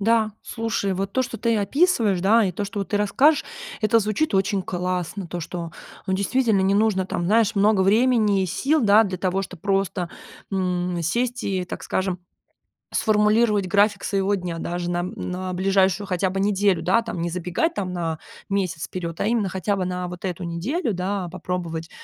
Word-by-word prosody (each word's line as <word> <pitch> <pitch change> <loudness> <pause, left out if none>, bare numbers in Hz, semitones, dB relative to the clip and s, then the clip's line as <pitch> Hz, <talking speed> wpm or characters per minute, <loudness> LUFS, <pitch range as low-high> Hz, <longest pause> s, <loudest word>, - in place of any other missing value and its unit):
Да, 220 0 +2
слушай, 225 -4 -2
вот 195 +1 -3
то, 260 - +1
что 230 - -5
ты 230 +1 +1
описываешь, 225 - +2
да, 220 +4 +5
и 185 - -2
то, 205 - -3
что 205 +1 -6
вот 195 - -4
ты 205 - 0
расскажешь, 270 +10 +3 0.4
это 230 +2 +4
звучит 215 +6 0
очень 195 0 +1
классно. 180 +1 -3
То, 175 +1 -5
что, 170 0 -6 0.3
ну, 190 - 0
действительно, 215 +1 +2
не 195 - +2
нужно 205 -3 +2
там, 175 -2 -3
знаешь, 220 +2 +3
много 205 -1 +3
времени 215 -1 +3
и - - 0
сил, 280 - +1
да, 215 +1 +6
для 190 -3 -4
того, 190 +1 0
чтоб 185 -3 -9
просто, 195 -2 0 0.4
м, 180 -2 -1
сесть 240 +9 -1
и, 190 -2 -1
так - - -7
скажем, 190 -1 -1 0.8
сформулировать 210 -1 +3
график 205 +1 +2
своего 200 0 +1
дня 180 -3 -4
даже 175 +1 -3
на 175 0 0
м 180 - -3
на 185 0 -4
ближайшую 190 +1 +2
хотя 185 0 0
бы 190 +1 -3
неделю, 200 -3 +2
да, 190 +7 +3
там, 225 -7 -5
не 170 - -1
забегать 180 - -1
там 185 -2 -3
на 165 -2 -2 0.3
месяц 185 -5 -1
вперёд, 170 -2 -5
а - - 0
именно 220 -4 +1
хотя 190 +2 -1
бы 190 -2 -2
на 180 0 -3
вот 175 +1 -9
эту 180 -1 -3
неделю, 215 - -2
да, 185 +1 -2
попробовать. 170 -2 -4
195 Hz, 190 wpm, -23 LUFS, 180-215 Hz, 0.8 s, да